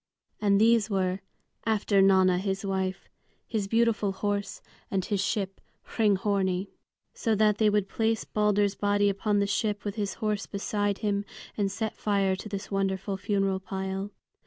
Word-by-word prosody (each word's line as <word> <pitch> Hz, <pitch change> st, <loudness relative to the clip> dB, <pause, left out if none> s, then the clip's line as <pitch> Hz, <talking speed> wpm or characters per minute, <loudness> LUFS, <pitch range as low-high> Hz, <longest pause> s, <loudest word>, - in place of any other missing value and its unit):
And 200 Hz, -1 st, +4 dB
these 225 Hz, 0 st, +4 dB
were, 190 Hz, -2 st, 0 dB, 0.4 s
after 210 Hz, -3 st, +2 dB
Nanna 190 Hz, -2 st, +5 dB
his 195 Hz, +1 st, -2 dB
wife, 190 Hz, -1 st, -2 dB, 0.4 s
his 215 Hz, -4 st, -2 dB
beautiful 225 Hz, -2 st, +2 dB
horse, 200 Hz, -1 st, -2 dB, 0.3 s
and 190 Hz, -2 st, -1 dB
his 200 Hz, -2 st, 0 dB
ship 195 Hz, -1 st, -2 dB, 0.3 s
Hringhorni. 195 Hz, -3 st, +1 dB, 0.4 s
So 225 Hz, -3 st, 0 dB
that 210 Hz, 0 st, +3 dB
they 215 Hz, -1 st, +5 dB
would 205 Hz, -1 st, +1 dB
place 225 Hz, +1 st, 0 dB
Balder's 205 Hz, -1 st, +2 dB
body 205 Hz, 0 st, +2 dB
upon 205 Hz, +1 st, 0 dB
the 200 Hz, -, +3 dB
ship 205 Hz, +1 st, -1 dB
with 205 Hz, +1 st, -3 dB
his 205 Hz, -2 st, -2 dB
horse 210 Hz, -2 st, -2 dB
beside 205 Hz, 0 st, -1 dB
him, 200 Hz, -1 st, +1 dB, 0.3 s
and 200 Hz, -2 st, 0 dB
set 215 Hz, +3 st, -3 dB
fire 200 Hz, -2 st, +1 dB
to 215 Hz, -, -8 dB
this 200 Hz, 0 st, -5 dB
wonderful 195 Hz, 0 st, -1 dB
funeral 195 Hz, -1 st, 0 dB
pile. 190 Hz, 0 st, -4 dB
200 Hz, 155 wpm, -28 LUFS, 195-210 Hz, 0.4 s, Nanna